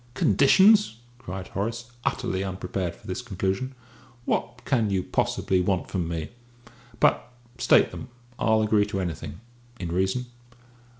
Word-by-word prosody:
"Conditions!" 190 Hz, -, +5 dB, 0.2 s
cried 95 Hz, -2 st, -7 dB
Horace, 115 Hz, +5 st, -4 dB
utterly 95 Hz, 0 st, -1 dB
unprepared 95 Hz, -2 st, -3 dB
for -, -, -21 dB
this 95 Hz, +6 st, -4 dB
conclusion. 100 Hz, +3 st, -2 dB, 0.5 s
"What 120 Hz, 0 st, -2 dB
can 115 Hz, -6 st, +2 dB
you 95 Hz, -2 st, 0 dB
possibly 95 Hz, 0 st, 0 dB
want 90 Hz, 0 st, -1 dB
from 90 Hz, -4 st, -1 dB
me? 80 Hz, -2 st, -4 dB, 0.7 s
But -, -, +2 dB, 0.3 s
state -, -, +5 dB
them. -, -, -8 dB, 0.3 s
I'll 110 Hz, -1 st, +3 dB
agree 105 Hz, -1 st, +3 dB
to 100 Hz, -2 st, -3 dB
anything, 90 Hz, +2 st, -5 dB, 0.4 s
in 85 Hz, -3 st, -4 dB
reason!" 95 Hz, +8 st, 0 dB
95 Hz, 130 wpm, -26 LUFS, 95-120 Hz, 0.7 s, Conditions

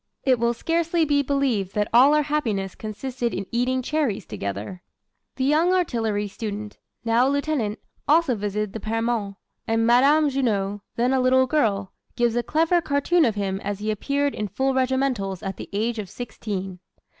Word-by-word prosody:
It 255 Hz, -3 st, +3 dB
will 235 Hz, 0 st, +1 dB
scarcely 335 Hz, +3 st, +1 dB
be 290 Hz, -1 st, +2 dB
believed 260 Hz, -9 st, 0 dB
that 210 Hz, 0 st, +1 dB
all 265 Hz, +5 st, +7 dB
our 300 Hz, -, +3 dB
happiness 225 Hz, -11 st, -1 dB
consisted 235 Hz, +3 st, -4 dB
in 195 Hz, -, -3 dB
eating 255 Hz, +2 st, 0 dB
cherries 260 Hz, -, -1 dB
together." 100 Hz, -, -5 dB, 0.5 s
The 260 Hz, -, -2 dB
young 310 Hz, +6 st, +3 dB
artillery 225 Hz, -, 0 dB
student 210 Hz, 0 st, -6 dB, 0.3 s
now 230 Hz, +3 st, +3 dB
a -, -, +2 dB
lieutenant 280 Hz, -7 st, -1 dB, 0.3 s
also 310 Hz, -2 st, +4 dB
visited 210 Hz, -1 st, -3 dB
the 225 Hz, -, -4 dB
Permons; 225 Hz, -2 st, -2 dB, 0.3 s
and 225 Hz, 0 st, +1 dB
Madame 280 Hz, +6 st, +5 dB
Junot, 205 Hz, -7 st, -1 dB
then 245 Hz, +3 st, +1 dB
a 265 Hz, -, +3 dB
little 260 Hz, +1 st, +4 dB
girl, 210 Hz, -9 st, 0 dB, 0.2 s
gives 240 Hz, -1 st, +1 dB
a 240 Hz, -, +2 dB
clever 325 Hz, +7 st, +2 dB
cartoon 310 Hz, +3 st, +2 dB
of 225 Hz, -4 st, 0 dB
him 195 Hz, -2 st, -2 dB
as 205 Hz, 0 st, -3 dB
he 215 Hz, +2 st, -2 dB
appeared 280 Hz, +6 st, -1 dB
in 210 Hz, -, -3 dB
full 265 Hz, +7 st, 0 dB
regimentals 255 Hz, -8 st, 0 dB
at 195 Hz, -1 st, -4 dB
the -, -, -8 dB
age 225 Hz, +3 st, -1 dB
of 200 Hz, -3 st, -5 dB
sixteen. 195 Hz, -5 st, -5 dB
235 Hz, 170 wpm, -24 LUFS, 205-275 Hz, 0.5 s, all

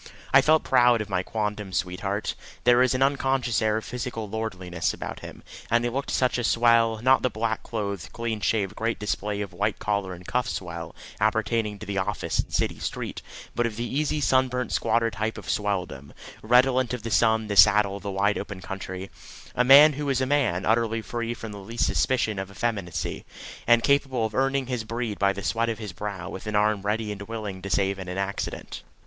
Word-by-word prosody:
I 135 Hz, -, +8 dB
felt 155 Hz, +3 st, +4 dB
proud 125 Hz, -2 st, +4 dB
of 105 Hz, -1 st, -4 dB
my 90 Hz, -1 st, +1 dB
quondam 105 Hz, 0 st, -3 dB
sweetheart. 95 Hz, +3 st, -2 dB, 0.3 s
There 120 Hz, 0 st, +5 dB
was 130 Hz, 0 st, +3 dB
an 130 Hz, -, +3 dB
unconscious 135 Hz, -4 st, +1 dB
air 110 Hz, 0 st, +2 dB
of 110 Hz, -, -5 dB
physical 120 Hz, -3 st, -4 dB
lordliness 90 Hz, -6 st, -3 dB
about -, -, -6 dB
him, -, -, -10 dB, 0.3 s
and 120 Hz, +1 st, +3 dB
he 120 Hz, -, 0 dB
looked 140 Hz, +3 st, -3 dB
such 125 Hz, -1 st, +1 dB
a -, -, -2 dB
swell 115 Hz, -1 st, +3 dB
not 130 Hz, +1 st, +5 dB
the 130 Hz, -, +1 dB
black 110 Hz, 0 st, -2 dB
clothed, 100 Hz, -9 st, -4 dB
clean 115 Hz, -2 st, -3 dB
shaved, 100 Hz, -1 st, 0 dB
great 115 Hz, 0 st, -1 dB
display 105 Hz, 0 st, -2 dB
of 100 Hz, -3 st, -5 dB
white 100 Hz, +4 st, -1 dB
collar 100 Hz, -3 st, -2 dB
and 90 Hz, +1 st, -14 dB
cuffs 125 Hz, -1 st, -1 dB
swell 85 Hz, -2 st, -6 dB, 0.2 s
appertaining 110 Hz, 0 st, 0 dB
to 105 Hz, -, -9 dB
the 100 Hz, -1 st, -2 dB
office 100 Hz, +1 st, -2 dB
and -, -, -1 dB
city -, -, -1 dB
street, -, -, -4 dB, 0.3 s
but 120 Hz, -1 st, +1 dB
of 110 Hz, -, -6 dB
the 115 Hz, -, -3 dB
easy 150 Hz, +4 st, -1 dB
sunburnt 130 Hz, -3 st, +1 dB
squatter 115 Hz, 0 st, +1 dB
type 110 Hz, +2 st, -3 dB
of -, -, -9 dB
swelldom, 90 Hz, -9 st, -2 dB, 0.3 s
redolent 125 Hz, +1 st, +3 dB
of 120 Hz, -, -9 dB
the 115 Hz, -, -4 dB
sun, 110 Hz, -1 st, +3 dB
the 105 Hz, -1 st, -3 dB
saddle, 100 Hz, 0 st, +6 dB
the 100 Hz, -, -5 dB
wide 100 Hz, +1 st, +1 dB
open 100 Hz, -1 st, -6 dB
country 95 Hz, 0 st, -6 dB, 0.4 s
a 125 Hz, -, +2 dB
man 145 Hz, +4 st, +8 dB
who 145 Hz, 0 st, -3 dB
is 135 Hz, -2 st, +1 dB
a 130 Hz, -, +1 dB
man, 130 Hz, -10 st, +1 dB
utterly 115 Hz, 0 st, +1 dB
free 120 Hz, 0 st, -3 dB
from 115 Hz, -2 st, -8 dB
the 100 Hz, -, -8 dB
least 115 Hz, +5 st, -1 dB
suspicion 110 Hz, -6 st, +1 dB
of 95 Hz, 0 st, -5 dB
effeminacy, 100 Hz, -4 st, -3 dB, 0.4 s
and 120 Hz, 0 st, +5 dB
capable 135 Hz, -4 st, +2 dB
of 110 Hz, -, -4 dB
earning 135 Hz, +2 st, +1 dB
his 125 Hz, -3 st, -3 dB
bread 115 Hz, -1 st, -4 dB
by 100 Hz, 0 st, +3 dB
the 100 Hz, 0 st, -6 dB
sweat 115 Hz, 0 st, 0 dB
of 115 Hz, -, -2 dB
his 105 Hz, -5 st, -7 dB
brow 100 Hz, -1 st, -5 dB
with 95 Hz, -, -8 dB
an 105 Hz, -, -2 dB
arm 105 Hz, -1 st, +2 dB
ready 105 Hz, +1 st, -1 dB
and 105 Hz, -1 st, -7 dB
willing 105 Hz, -4 st, -5 dB
to 100 Hz, -, -6 dB
save 95 Hz, 0 st, +1 dB
in 95 Hz, -, -7 dB
an 90 Hz, +1 st, -5 dB
accident. 100 Hz, +1 st, -4 dB
110 Hz, 205 wpm, -26 LUFS, 100-120 Hz, 0.4 s, I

